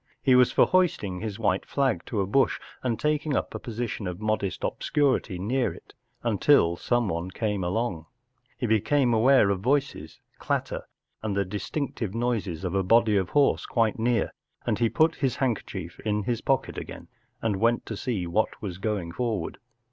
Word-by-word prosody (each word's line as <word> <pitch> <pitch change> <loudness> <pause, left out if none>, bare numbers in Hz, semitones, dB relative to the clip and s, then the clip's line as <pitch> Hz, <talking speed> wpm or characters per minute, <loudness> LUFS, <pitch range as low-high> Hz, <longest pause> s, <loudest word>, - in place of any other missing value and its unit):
He 130 - +3
was 125 -1 +6
for - - +5
hoisting 155 - +1
his 105 -1 -4
white 100 -4 +1
flag 130 -11 0
to 105 - -1
a - - 0
bush 130 +8 +2 0.2
and 120 -4 -1
taking 150 -1 0
up - - -1
a - - -4
position 115 -3 -4
of 90 +1 -5
modest 105 -3 -1
obscurity 135 -9 0
near 120 +7 0
it, - - -14 0.3
until 110 -5 +4
someone 95 -5 -1
came 105 -1 -2
along* 90 -3 -2 0.5
He - - -2
became 120 +4 +2
aware 115 -2 +5
of 95 - -1
voices, 135 - -1 0.2
clatter, - - -2 0.3
and 105 -3 -2
the 100 - +1
distinctive 105 - -4
noises 110 -8 -1
of 90 -1 -2
a 95 - +2
body 110 +2 +4
of 95 -3 +1
horse, 145 -1 +2
quite 115 -2 +1
near, 115 -2 +1 0.3
and - - 0
he 115 -1 +3
put 160 +4 +2
his 135 -4 0
handkerchief 100 -9 -3
in 105 -1 -1
his 120 +1 -1
pocket 135 -2 0
again - - -9 0.3
and 110 -4 0
went 115 +3 +2
to 110 - -5
see 100 -4 -2
what 95 +6 0
was 95 -4 -6
going 100 -5 -2
forward. 115 +1 -3
110 Hz, 175 wpm, -26 LUFS, 95-125 Hz, 0.5 s, was